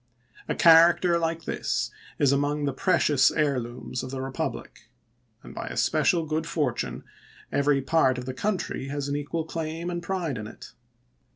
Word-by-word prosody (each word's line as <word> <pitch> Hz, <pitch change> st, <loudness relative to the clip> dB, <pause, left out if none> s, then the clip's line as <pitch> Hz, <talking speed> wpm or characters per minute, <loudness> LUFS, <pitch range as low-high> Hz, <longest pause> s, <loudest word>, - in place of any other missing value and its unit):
A -, -, 0 dB
character 170 Hz, +1 st, +6 dB
like 165 Hz, 0 st, -2 dB
this -, -, -2 dB, 0.3 s
is 140 Hz, -2 st, +3 dB
among 145 Hz, +1 st, 0 dB
the 140 Hz, -, -1 dB
precious 150 Hz, -3 st, +3 dB
heir 145 Hz, -4 st, +1 dB
looms 120 Hz, +1 st, -6 dB
of 130 Hz, -, -6 dB
the 135 Hz, -, -5 dB
Eepublic; 130 Hz, 0 st, -5 dB, 0.6 s
and -, -, -11 dB
by -, -, -6 dB
a -, -, -6 dB
special 170 Hz, -3 st, +2 dB
good 155 Hz, +1 st, -2 dB
for 150 Hz, -7 st, 0 dB
tune 60 Hz, -, -5 dB, 0.5 s
every 140 Hz, -1 st, +2 dB
part 130 Hz, -3 st, +3 dB
of 125 Hz, -, -5 dB
the 130 Hz, -, -4 dB
country 185 Hz, -3 st, -2 dB
has 140 Hz, 0 st, -3 dB
an 140 Hz, -, -2 dB
equal 145 Hz, +3 st, -3 dB
claim 165 Hz, +1 st, -4 dB
and 175 Hz, 0 st, -3 dB
pride 170 Hz, -8 st, -3 dB
in 105 Hz, -, -6 dB
it. -, -, -12 dB
145 Hz, 175 wpm, -26 LUFS, 135-165 Hz, 0.6 s, character